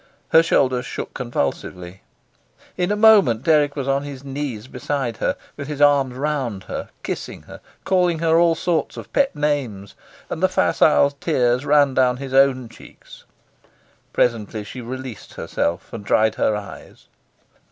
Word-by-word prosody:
Her 160 - +7
shoulders 130 -6 +1
shook - - -6
convulsively. 90 - -4 0.7
In 180 +2 -1
a - - +2
moment 205 - +5
Dirk 150 -2 +3
was 140 -2 -3
on 135 0 +1
his 140 -2 -8
knees 135 -5 -5
beside 130 -2 -3
her, - - -1 0.2
with 145 -1 -7
his 150 -2 -5
arms 140 -3 +3
round 130 -8 -2
her, - - -6
kissing - - -5
her, - - -12 0.2
calling 180 -3 +2
her 165 0 +3
all 170 -1 +4
sorts 170 -1 -1
of - - -10
pet 275 - +2
names, 130 -10 -2 0.3
and 160 - -5
the 185 - +3
facile 150 -5 +3
tears 130 -3 0
ran 145 -2 +4
down 125 -1 +2
his 135 0 -7
own 135 -2 +3
cheeks. 115 - -16 0.9
Presently 110 -3 0
she 125 +5 -8
released 130 -2 -8
herself 85 +3 -3
and 115 -3 -6
dried 110 +1 +2
her 110 - +1
eyes. 105 -1 -10
135 Hz, 150 wpm, -21 LUFS, 120-150 Hz, 0.9 s, Her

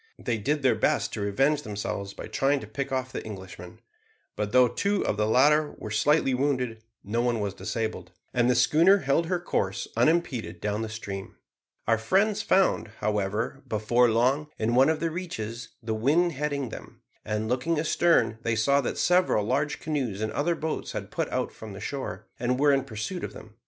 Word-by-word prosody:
They 115 -2 -2
did 145 +7 -1
their 130 -3 +5
best 110 - 0
to 105 - -3
revenge 135 +9 +2
themselves 100 -3 -4
by - - -7
trying 140 +1 +1
to - - -7
pick 135 +6 -4
off 130 -1 -2
the - - -5
Englishmen; 95 -4 -9 0.5
but 105 -1 -2
though 125 0 +6
two 200 - 0
of - - 0
the 105 +1 +1
latter 145 +6 +4
were 110 - -7
slightly 135 +5 +3
wounded, 125 -4 -1 0.2
no 115 +4 -1
one 120 -2 +1
was 100 -2 -2
disabled, 105 -2 -4 0.2
and 120 -1 +3
the 125 - +3
schooner 170 +10 +5
held 150 +5 +2
her 180 0 0
course 100 - -2
unimpeded 125 - +1
down 105 +2 -2
the 110 - -3
stream. 100 -3 -6 0.5
Our 115 -1 +3
friends 195 - +2
found, 190 -10 +2
however, 105 +5 -1
before 120 +2 +3
long, 130 +7 +2
in 110 +2 0
one 130 +4 +5
of 160 -1 0
the 165 -1 0
reaches, 120 -10 -5
the 110 0 -2
wind 150 +11 +2
heading 145 -3 -2
them; - - -11 0.2
and, 105 +1 -2
looking 130 +8 0
astern, 160 -7 +2
they 115 -1 0
saw 140 +6 +3
that 125 - -3
several 180 - +3
large 145 +6 0
canoes 135 -10 -2
and 110 0 -2
other 170 +4 0
boats 160 0 -4
had - - -5
put - - -2
out - - -2
from 110 -2 -10
the 95 - -8
shore, 110 -4 -5
and 125 +1 0
were 145 0 +5
in 135 -1 +1
pursuit 110 - -5
of - - -5
them. 110 - -12
125 Hz, 195 wpm, -27 LUFS, 110-150 Hz, 0.5 s, though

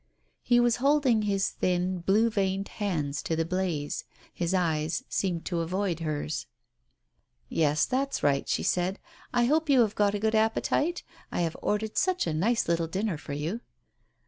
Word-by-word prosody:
He 240 -1 +3
was 240 -1 +3
holding 270 -4 +3
his 200 -2 +1
thin, 180 0 0
blue 210 +6 +3
veined 195 -2 -1
hands 155 -9 -2
to 165 - -1
the 165 0 0
blaze. 175 -4 -2 0.3
His 170 0 -1
eyes 165 -3 0
seemed 175 -4 -1
to 175 - -1
avoid 180 +1 -1
hers. 155 -1 -3 1.0
"Yes, 150 -1 +2
that's 275 +2 -1
right," 140 -1 +2
she - - 0
said. 180 +2 0 0.3
"I 240 -1 +3
hope 310 +4 +2
you 265 -3 +6
have 215 -3 +2
got 205 -1 +2
a - - -1
good 220 +1 +1
appetite? 225 +10 +1 0.3
I - - -1
have 165 -2 -1
ordered 215 +1 0
such 370 -1 +1
a 160 - -1
nice 220 +10 +1
little 170 -1 +1
dinner 190 -1 -2
for 145 - -7
you." 160 +11 -3
190 Hz, 170 wpm, -28 LUFS, 165-225 Hz, 1.0 s, you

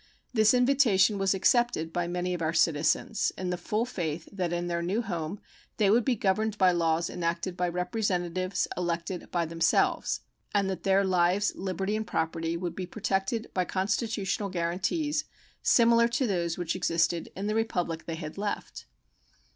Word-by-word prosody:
This 220 0 +5
invitation 240 -6 +4
was 195 0 +2
accepted 190 -6 +2
by 175 -1 -1
many 180 +1 -2
of 175 - -4
our 160 0 0
citizens 160 +6 +2
in 185 -1 -2
the - - 0
full 210 +6 -1
faith 165 -8 -4
that 185 -4 -2
in 175 0 -1
their 170 -1 -1
new 195 +7 -1
home 175 -1 -4 0.4
they 200 -2 +4
would 235 +2 +4
be 255 0 +1
governed 215 +1 0
by 185 -2 +5
laws 165 -1 +1
enacted 170 +1 -2
by 180 0 0
representatives 185 -1 -1
elected 175 0 -3
by 170 -1 0
themselves, 165 +1 +1 0.3
and 200 -1 +3
that 190 - -5
their 195 0 +3
lives, 185 +2 +2
liberty, 190 +2 -2
and 220 0 -3
property 165 +1 -1
would 170 -1 -4
be 185 -2 -4
protected 200 +3 -2
by 185 - +1
constitutional 200 +1 -1
guaranties 190 - -1 0.4
similar 235 -1 +5
to 245 +3 0
those 170 -6 -1
which 175 -1 -2
existed 170 -2 0
in 195 - -4
the 210 - 0
Republic 180 -7 -1
they 165 - -3
had 160 +2 -7
left. 205 0 -4
185 Hz, 165 wpm, -28 LUFS, 170-210 Hz, 0.4 s, This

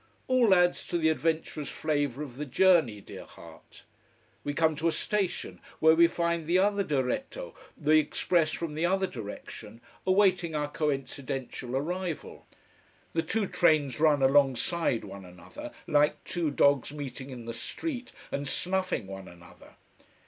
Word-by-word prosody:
All 245 -6 +5
adds 180 0 +2
to 175 - -1
the 160 -1 +3
adventurous 160 -2 -1
flavour 145 -3 -1
of 130 -4 -9
the 150 - -3
journey, 155 - +3
dear - - -10
heart. - - -15 0.6
We 145 - -2
come 160 -1 +2
to 165 +2 0
a - - +3
station 195 0 -2 0.2
where 160 0 +6
we 170 +1 +6
find 170 -1 -1
the 175 +2 +3
other 200 +1 +2
diretto, 165 - -2 0.2
the 155 0 +4
express 155 +1 +1
from 165 -2 -4
the 155 +2 -2
other 190 +2 +2
direction, 110 - -8 0.3
awaiting 185 -4 +3
our 145 -1 -2
coincidential 135 -3 -3
arrival. 175 +3 -4 0.7
The 165 - +2
two 205 +6 -1
trains 155 -8 +2
run 150 -3 +4
alongside 135 0 +2
one 100 0 -9
another, 90 0 -10 0.2
like 150 0 +2
two 170 -3 -1
dogs 140 -1 +3
meeting 140 -2 -7
in 125 -3 -8
the 115 - -5
street 250 - -5 0.2
and 140 0 -2
snuffing 185 - -1
one 95 0 -8
another. 85 0 -16
155 Hz, 150 wpm, -29 LUFS, 135-175 Hz, 0.7 s, where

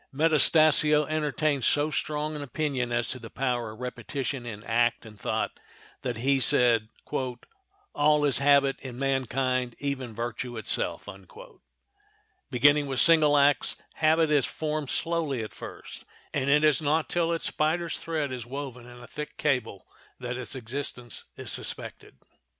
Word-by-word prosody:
Metastasio 155 0 +4
entertained 150 -2 0
so 145 +5 +2
strong 150 +1 -2
an 150 - -5
opinion 140 -3 -2
as 120 0 0
to 130 - -4
the 115 -1 -10
power 125 -3 -2
of 110 +3 -11
repetition 125 0 -4
in 105 -2 -7
act 120 +1 +1
and 105 -2 -13
thought - - -2 0.4
that 120 -3 -3
he 135 +3 +2
said, 120 -5 +4 1.0
"All 150 0 +3
is 135 -4 +2
habit 140 -1 +4
in 125 -3 -8
mankind, 130 -2 -1
even 135 -5 -4
virtue 120 +1 -4
itself." 110 - 0 1.4
Beginning 145 +3 +4
with 135 -2 -1
single 155 -3 +6
acts 145 0 +3 0.2
habit 160 0 +3
is 145 -4 +3
formed 155 -3 -3
slowly 160 -8 -1
at 110 - -8
first, - - -10 0.3
and 140 -1 0
it 150 +2 +4
is 150 0 +4
not 155 +1 +1
till 170 -1 0
its 165 - -1
spider's 165 +2 0
thread 155 -4 -2
is 125 -2 -5
woven 125 -1 -7
in 120 0 -12
a - - -10
thick 150 0 -7
cable 125 -9 -1 0.3
that 125 -1 -4
its 125 +2 -5
existence 125 -1 -5
is - - -4
suspected. - - -5
140 Hz, 150 wpm, -27 LUFS, 125-150 Hz, 1.4 s, single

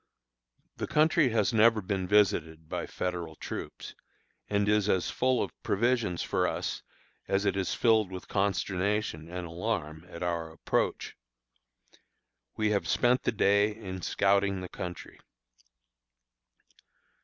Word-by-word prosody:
The - - -3
country 155 -2 +3
has 110 0 +1
never 115 0 +5
been 95 -2 -2
visited 80 -6 +2
by - - -4
Federal 85 -3 -4
troops, - - -7 0.6
and 100 0 +1
is 105 -1 +2
as 95 -3 +1
full 130 0 +1
of - - -5
provisions 115 -4 0
for - - +1
us - - -3 0.5
as 100 +1 +1
it 100 - +1
is 95 -2 -1
filled 110 -5 +3
with 90 -1 -7
consternation 95 -3 -1
and 90 0 -5
alarm 85 -2 -4
at 85 0 -7
our 85 -2 -2
approach. 80 - -1 1.4
We 110 -1 +1
have 100 - 0
spent 125 +1 +3
the - - 0
day 100 0 +3
in 95 -4 -7
scouting 100 0 +1
the 90 - -6
country. 90 -1 -7
100 Hz, 130 wpm, -29 LUFS, 90-110 Hz, 1.4 s, never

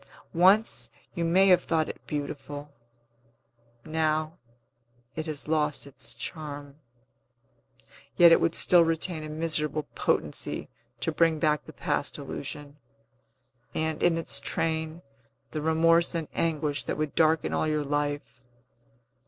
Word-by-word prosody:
Once, 180 - +3 0.2
you 170 - -2
may 180 +4 +4
have 180 - +5
thought 160 -2 +1
it - - -7
beautiful; 145 0 -5 1.1
now, 155 +1 -1 0.8
it 160 0 -4
has 150 -2 -3
lost 150 -2 0
its 140 -1 -7
charm. 145 -3 -6 1.4
Yet 170 -2 +8
it - - +6
would 165 - +2
still 175 -2 +6
retain 165 0 0
a 155 - -7
miserable 155 -1 0
potency' - - -1 0.3
to - - 0
bring 165 0 +3
back 150 -1 +1
the - - -10
past - - -2
illusion, 145 0 -7 1.0
and, 160 0 -1
in 170 -1 +3
its 165 - 0
train, 160 +1 -2 0.5
the 155 - -3
remorse 165 +2 +3
and 165 -2 -2
anguish 150 -3 -1
that - - -2
would 155 -1 -2
darken 160 0 +2
all - - +1
your 155 -1 0
life. 145 -2 -3
155 Hz, 130 wpm, -27 LUFS, 150-165 Hz, 1.4 s, Yet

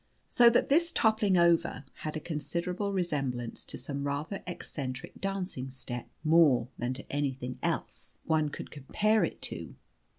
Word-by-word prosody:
So 240 -1 +7
that 235 - +2
this 335 +4 +4
toppling 220 - +3
over 170 -5 +3
had 155 0 -4
a - - -2
considerable 170 +6 -2
resemblance 140 -10 -2
to - - -5
some 140 +2 -4
rather 150 +7 -3
eccentric 135 -6 -5
dancing 190 -9 -3
step 125 -2 -6 0.2
more 155 -7 +5
than 125 +2 -2
to 135 - -8
anything 135 -3 -2
else - - -3
one 155 -2 +2
could - - -7
compare 210 +10 +2
it - - -3
to. - - -4
155 Hz, 145 wpm, -30 LUFS, 135-190 Hz, 0.2 s, So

